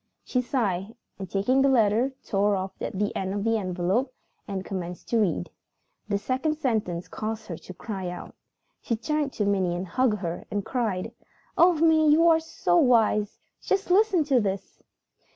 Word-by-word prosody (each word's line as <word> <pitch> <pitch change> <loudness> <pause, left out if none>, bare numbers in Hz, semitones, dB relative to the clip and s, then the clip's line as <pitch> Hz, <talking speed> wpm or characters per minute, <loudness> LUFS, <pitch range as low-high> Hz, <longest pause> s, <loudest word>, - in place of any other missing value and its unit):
She 250 - 0
sighed 220 -5 -2 0.2
and, 190 -2 -6
taking 225 +9 +2
the 275 - +4
letter, 235 +1 +3
tore 200 +1 +2
off 190 0 -3
the 205 +1 -2
end 190 +1 -2
of 200 - -2
the 225 0 +1
envelope 190 +7 -1 0.4
and 195 -2 -4
commenced 180 -2 -6
to 230 - +2
read. 170 - 0 0.6
The 200 - +1
second 260 +8 -1
sentence 215 - -1
caused 220 0 -5
her 170 -5 -6
to 185 - -11
cry 190 -4 -5
out. 175 - -8 0.5
She 230 - -1
turned 295 +5 -1
to 210 - -1
Minnie, 185 -3 0
hugged 210 +4 +1
her, 170 -2 -4
and 205 -1 -3
cried, 220 -8 -2 0.4
"Oh, 355 +1 +6
Minnie, 315 -1 +4
you 330 +2 +5
are 325 -1 +5
so 325 +2 0
wise! 225 -7 +3 0.2
Just 390 -1 -1
listen 390 -3 +4
to 275 -4 +3
this!" 195 -1 -4
215 Hz, 170 wpm, -26 LUFS, 190-265 Hz, 0.6 s, Oh